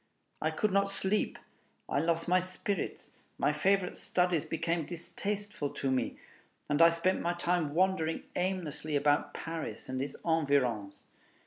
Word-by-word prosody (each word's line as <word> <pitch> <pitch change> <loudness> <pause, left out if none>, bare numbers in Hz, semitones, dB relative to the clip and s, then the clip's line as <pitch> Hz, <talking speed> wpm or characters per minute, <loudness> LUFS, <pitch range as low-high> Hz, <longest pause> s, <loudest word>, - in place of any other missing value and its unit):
I - - +2
could 215 -2 0
not 200 +1 +3
sleep, 195 +1 0 0.5
I - - +1
lost 165 +2 +1
my 180 +1 +5
spirits, 185 +3 -4 0.3
my - - +2
favorite 195 -2 +2
studies 180 -3 +1
became 165 0 -1
distasteful 200 0 -3
to 135 - 0
me, 130 - 0 0.5
and 145 +2 +2
I 165 - +10
spent 170 +3 +1
my 175 - +1
time 175 -4 0
wandering 180 -3 +2
aimlessly 170 -5 -1
about 145 0 +2
Paris 165 -4 -5
and 130 0 -2
its 140 - -4
environs. 140 -11 +1
170 Hz, 140 wpm, -31 LUFS, 145-185 Hz, 0.5 s, I